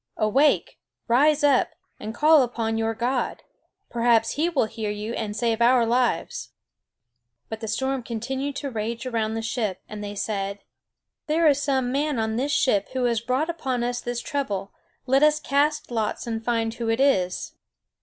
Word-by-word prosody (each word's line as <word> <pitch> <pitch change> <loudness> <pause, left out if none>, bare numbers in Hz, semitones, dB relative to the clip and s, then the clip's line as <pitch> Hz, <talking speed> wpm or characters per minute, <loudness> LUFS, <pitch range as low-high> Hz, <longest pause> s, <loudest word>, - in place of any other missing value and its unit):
Awake, 270 +8 +2 0.3
rise 290 +5 +4
up, 280 -3 +3 0.2
and 215 - -5
call 305 +1 +6
upon 230 -3 -1
your 225 0 0
God. 250 +3 -1 0.5
Perhaps 230 -1 +3
He 315 +5 0
will 290 -9 +1
hear 220 -1 -4
you 210 +2 -4
and 210 -3 -3
save 230 -1 0
our 240 0 +5
lives." 240 +1 0 1.0
But 220 - -5
the 220 - -5
storm 265 +4 -1
continued 265 +5 -4
to 280 -1 -4
rage 230 +2 -3
around 225 -3 -1
the 225 - -3
ship; 220 -5 -2
and 210 0 -7
they 205 0 -5
said: 200 -1 -2 0.7
"There 320 +2 +2
is 285 -1 +4
some 265 -3 0
man 290 0 0
on 220 -1 -1
this 270 +5 -1
ship 230 -8 +2
who 260 -1 -1
has 235 -3 +1
brought 255 +6 0
upon 270 -8 -2
us 245 0 -2
this 240 0 -3
trouble. 200 -9 -3 0.3
Let 265 +1 +3
us 300 0 +5
cast 295 0 0
lots 220 -3 -2
and 225 -1 -3
find 225 -1 0
who 235 -1 -3
it 225 +2 +1
is." 190 -10 +1
240 Hz, 175 wpm, -24 LUFS, 220-275 Hz, 1.0 s, call